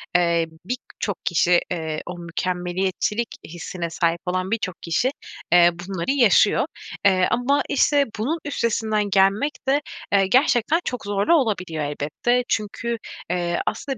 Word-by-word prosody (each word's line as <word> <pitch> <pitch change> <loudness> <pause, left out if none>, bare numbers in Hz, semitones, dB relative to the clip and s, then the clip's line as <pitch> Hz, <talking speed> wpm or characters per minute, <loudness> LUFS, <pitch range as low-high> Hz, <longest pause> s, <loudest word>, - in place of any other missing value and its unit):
eee, 170 -2 +3 0.2
birçok 220 -4 -4
kişi, 175 +1 +4
eee, 160 -3 -3
o 180 0 -6
mükemmeliyetçilik 185 +5 -2 0.2
hissine 170 +1 -5
sahip 165 0 0
olan 185 +2 -2
birçok 210 -5 -1
kişi, 205 +11 0 0.4
eee, 175 0 +7
bunları 175 +5 -3
yaşıyor. 245 -7 +4 0.4
Eee, 185 -2 +4
ama, 275 +4 +2
işte, 285 0 +3
bunun 300 +10 0
üstesinden 220 -6 0
gelmek 195 +9 +3 0.2
de, 280 +2 +3 0.3
eee, 195 -1 +5
gerçekten 260 - +3
çok 250 -4 -4
zorlu 205 +10 +2
olabiliyor 185 - 0
elbette. 150 +13 0
Çünkü, 230 +2 -2 0.3
eee, 175 -1 -1
aslında 265 +4 -2
195 Hz, 130 wpm, -23 LUFS, 175-240 Hz, 0.4 s, eee